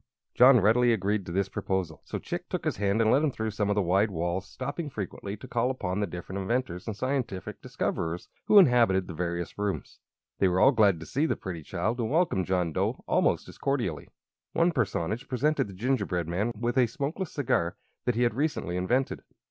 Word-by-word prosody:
John 125 0 +7
readily 120 +3 +4
agreed 100 -1 -1
to - - -5
this 95 +2 0
proposal; 95 -4 -3
so - - -4
Chick - - -5
took - - -3
his - - -1
hand 100 +3 +2
and 110 - +3
led 140 - +4
him 155 - +3
through 110 -4 -3
some 105 0 -1
of 105 - +2
the 105 - +2
wide 95 +5 +3
halls, 90 +1 -2
stopping 145 +7 -5
frequently 100 -3 -5
to 130 - -10
call 120 0 0
upon 100 -7 -2
the 105 - 0
different 90 +3 -6
inventors 95 -3 -2
and 110 - -3
scientific 130 -8 -3
discoverers 80 +2 -3 0.2
who 210 - +6
inhabited 120 - +5
the 85 - -6
various 85 +2 -3
rooms. 105 -1 -3 0.4
They 95 - +4
were 90 0 +1
all 135 - +7
glad 105 - +4
to - - -7
see 145 - 0
the - - 0
pretty 90 -4 -6
child 110 - -2
and 110 -2 -1
welcomed 150 - +1
John 90 -3 0
Dough - - -1
almost - - +2
as - - -13
cordially. 120 - -1 0.5
One 170 +1 +3
personage 115 - -1
presented 140 +1 +1
the 100 - -10
gingerbread 100 -7 -1
man 95 +7 -1
with 120 +2 +1
a 125 - +5
smokeless 150 - -4
cigar 90 - 0 0.3
that 125 - +1
he 120 - +2
had 120 - +2
recently 130 - -1
invented. 125 +9 0
105 Hz, 205 wpm, -28 LUFS, 90-125 Hz, 0.5 s, John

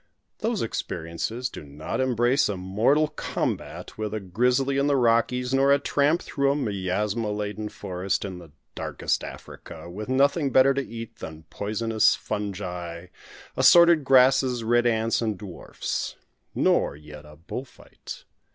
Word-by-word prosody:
Those - - -1
experiences 85 +10 -3
do - - -9
not 75 - -4
embrace 125 +1 +2
a 100 - -2
mortal 110 +12 +2
combat - - -4
with 110 0 -3
a - - -2
"grizzly" 125 +8 +1
in 140 - +2
the 145 - +3
Rockies, 125 +1 +2
nor 135 +1 +4
a 140 - +6
tramp 145 +3 +1
through 140 -1 +1
a - - 0
miasma 105 -2 -1
laden 105 +1 -3
forest 95 +1 -3
in 90 -5 -8 0.2
Darkest - - -2
Africa, - - -10
with 105 +6 -7
nothing 140 +3 +3
better 130 +1 +5
to 140 - 0
eat 115 -3 -8
than 80 0 -9
poisonous 110 +2 +1
fungi, 90 -4 -5 0.5
assorted 170 -3 +6
grasses, 130 -2 +4
red 120 +1 +3
ants, 115 0 +1
and 110 -4 -1
dwarfs; 90 -2 -5 0.4
nor - - +2
yet 75 0 -12
a 75 0 -14
bull 85 - -6
fight. 135 - -12
115 Hz, 140 wpm, -25 LUFS, 95-130 Hz, 0.5 s, a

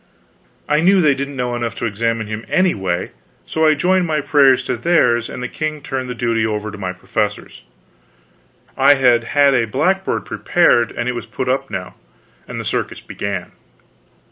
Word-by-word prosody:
I 150 - +2
knew 190 +4 +4
they 150 -5 +4
didn't 140 +1 -5
know 125 -1 -2
enough 120 -1 -3
to - - -4
examine 115 +1 -1
him 110 +1 -6
anyway, 95 - 0 0.3
so 160 0 +1
I 155 - +4
joined 180 +3 +2
my 155 -1 0
prayers 135 -3 +4
to 125 - -2
theirs 120 -4 +2
and 125 - -6
the - - -2
king 155 +2 -4
turned 130 -2 -4
the 125 - -4
duty 115 -2 0
over 105 -1 -2
to 105 - -9
my 95 -2 -3
professors. 105 +3 -4 1.1
I 140 +2 +5
had 125 -3 +3
had 140 +2 +3
a 120 -3 +2
blackboard 180 - 0
prepared, 120 -10 +2
and 120 - -4
it 125 - 0
was 120 -1 -6
put 125 +4 -4
up 135 +1 -1
now, - - -5 0.5
and - - -6
the - - -5
circus - - -2
began. 100 -3 -5
125 Hz, 180 wpm, -18 LUFS, 115-145 Hz, 1.1 s, I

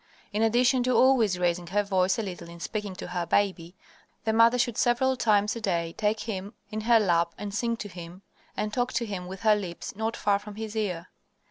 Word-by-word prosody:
In 210 - 0
addition 245 +3 +3
to 255 0 +1
always 240 -8 +4
raising 175 -1 0
her 205 +3 +1
voice 190 -2 +1
a 225 - -1
little 175 -3 -7
in 170 0 -11
speaking 205 +1 -4
to - - -7
her 175 -1 -3
baby, 185 -3 0 0.5
the 220 - 0
mother 230 +2 +5
should 245 -2 0
several 255 +3 +2
times 210 -3 +2
a 230 - -6
day 170 -5 -1
take 215 0 0
him 205 -1 -5 0.2
in 215 0 -3
her 230 +1 +5
lap 170 -4 +1
and 205 -1 -6
sing 230 +2 -1
to 210 - -6
him, 175 0 -10 0.3
and 210 0 -2
talk 245 +1 0
to 235 0 0
him 190 -4 -5
with 190 +1 -8
her 215 -2 +5
lips 185 -4 -6
not 220 +2 -2
far 200 -1 +2
from 210 0 -10
his 220 0 -6
ear. 185 -5 -2
210 Hz, 220 wpm, -27 LUFS, 185-225 Hz, 0.5 s, mother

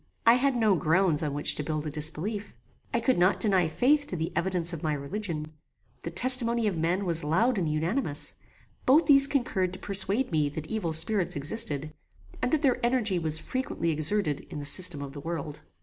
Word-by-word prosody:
I 230 - +7
had 260 +2 +1
no 220 -4 +2
grounds 165 -1 +2
on 145 -3 -3
which 145 - +2
to 150 - -4
build 155 0 -4
a 150 - -4
disbelief. 160 - -2 0.4
I 235 - 0
could 235 -3 0
not 180 +2 +2
deny 190 -5 +3
faith 285 - +1
to - - -5
the 160 -1 -4
evidence 175 -1 -1
of 160 - -6
my 155 -1 -1
religion; 155 +1 -5 0.5
the - - -5
testimony 235 +4 +3
of 205 -4 -1
men 170 +5 -1
was 165 -3 +1
loud 205 +10 +1
and 165 -4 -1
unanimous: 155 - -1 0.5
both 290 +6 +5
these 275 -2 +6
concurred 195 -10 -1
to - - -7
persuade 200 +6 0
me 150 -3 +1
that 155 +1 -7
evil 190 -2 -3
spirits 175 +4 +1
existed, 150 -1 +2 0.5
and 250 - -1
that 315 -1 0
their 255 -3 +1
energy 235 -7 +1
was 160 -2 -1
frequently 170 -3 -3
exerted 155 0 0
in - - -8
the 145 - -6
system 155 -1 +3
of 135 -1 -9
the 145 - -8
world. 155 -2 -6
180 Hz, 195 wpm, -27 LUFS, 155-230 Hz, 0.5 s, I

